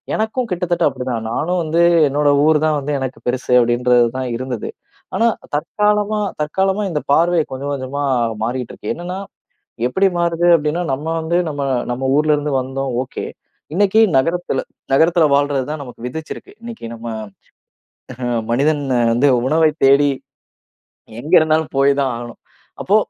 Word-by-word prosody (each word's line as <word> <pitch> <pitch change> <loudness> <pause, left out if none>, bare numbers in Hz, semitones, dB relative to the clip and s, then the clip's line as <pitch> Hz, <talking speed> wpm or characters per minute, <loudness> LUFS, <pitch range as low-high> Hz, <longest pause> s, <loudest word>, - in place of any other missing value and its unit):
எனக்கும் 220 +3 -1
கிட்டத்தட்ட 175 -1 0
அப்படி 130 -1 -7
தான் 115 -2 -3
நானும் 175 +7 -1
வந்து 165 +2 +1 0.3
என்னோட 145 +1 +1 0.2
ஊர் 155 -1 +4
தான் 155 -1 +2
வந்து 145 +2 -3
எனக்கு 130 -1 -5
பெருசு 125 0 -2
அப்படின்றது 120 0 +3
தான் 130 -1 -3
இருந்தது. 125 -1 -4 0.5
ஆனா 230 - +3 0.3
தற்காலமா 210 +6 0 0.2
தற்காலமா 190 +6 0
இந்த 150 -3 -2
பார்வை 170 +2 +3
கொஞ்சம் 140 +2 -4
கொஞ்சமா 140 +2 -4 0.4
மாறிக்கிட்டு 125 +1 -3
இருக்கு. 105 - -4
என்னன்னா 180 +2 -6 0.7
எப்படி 190 +9 +2
மாறுது 170 0 +1
அப்படின்னா, 155 +3 -2
நம்ம 145 +4 -4
வந்து 160 +2 -1
நம்ம 145 -1 -5 0.3
நம்ம 130 +2 -4
ஊர்ல 150 0 +3
இருந்து 145 0 -3
வந்தோம் 135 0 -4
ஒகே. - - -6 0.5
இன்னைக்கு 205 +3 +3 0.2
நகரத்தில 165 0 -1 0.3
நகரத்தில 165 +3 +4
வாழ்றது 140 -2 +1
தான் 155 - -4
நமக்கு 125 -2 -11
விதித்திருக்கு. 160 +5 -7
இன்னைக்கு 235 - -9
நம்ம 115 0 -10 1.5
மனிதன் 145 +4 +1 0.3
வந்து 125 +5 +3 0.2
உணவை 155 +2 +3
தேடி. 140 +1 +5 1.1
எங்கே 155 +7 -1
இருந்தாலும் 155 0 +1
போய் 140 +1 +4
தான் 135 -1 +1
ஆகணும். 120 0 -8 0.4
அப்போ 200 - +2
150 Hz, 145 wpm, -18 LUFS, 130-170 Hz, 1.5 s, தேடி